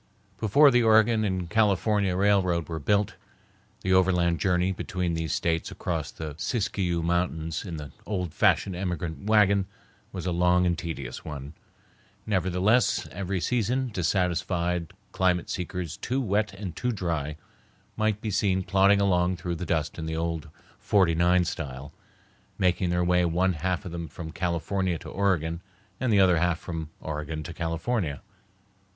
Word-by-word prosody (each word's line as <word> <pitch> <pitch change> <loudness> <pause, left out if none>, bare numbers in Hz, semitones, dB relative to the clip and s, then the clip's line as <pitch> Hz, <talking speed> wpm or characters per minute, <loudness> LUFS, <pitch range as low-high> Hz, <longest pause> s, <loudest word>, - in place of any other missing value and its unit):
Before 140 +7 +6
the 120 -1 +4
Oregon 110 0 +4
and 95 -4 -1
California 105 -1 +2
railroad 95 -4 +2
was 80 -2 -5
built, 100 +5 +1 0.6
the 95 - +1
overland 90 -2 +3
journey 90 -1 +2
between 90 -2 -2
these 80 -2 -2
States 85 -1 0
across 80 -4 -3
the 80 -2 -6
Siskiyou 95 -4 -1
Mountains 80 -2 -1
in 85 -5 -6
the 75 -2 -8 0.2
old 90 -6 -2
fashioned 95 - +2
emigrant 90 -2 -4
wagon 100 -3 +4 0.4
was 90 -2 -6
a 90 - 0
long 90 +1 +3
and 85 -1 +2
tedious 75 -7 -6
one. 70 -1 -7 0.7
Nevertheless, 95 +4 +2
every 95 +1 -3
season 125 +5 0
dissatisfied 90 -1 0 0.2
climate 90 -2 +1
seekers, 90 -3 -4
too 130 +2 -2
wet 105 -3 0
and 95 -3 -7
too 125 - -1
dry, 80 -8 -2 0.6
might 110 -1 0
be 110 - -3
seen 95 -1 +1
plodding 100 +2 +4
along 90 -2 +2
through 90 0 -3
the 90 - -5
dust 80 -1 -1
in 80 - -4
the 80 0 -3
old 80 -1 -3 0.3
"49style," 85 -7 +1 0.7
making 90 -1 +1
their 90 0 +1
way 90 0 +3
one 90 +2 +2
half 90 +4 -2
of 90 - -6
them 85 -1 -5
from 80 +1 -8
California 90 +1 -1
to - - -10
Oregon, 85 -4 0 0.4
the 115 -5 +3
other 90 -3 +5
half 90 -1 +1
from 80 -3 -6
Oregon 75 0 -4
to 85 - -7
California. 85 - -2
90 Hz, 145 wpm, -27 LUFS, 85-100 Hz, 0.7 s, Before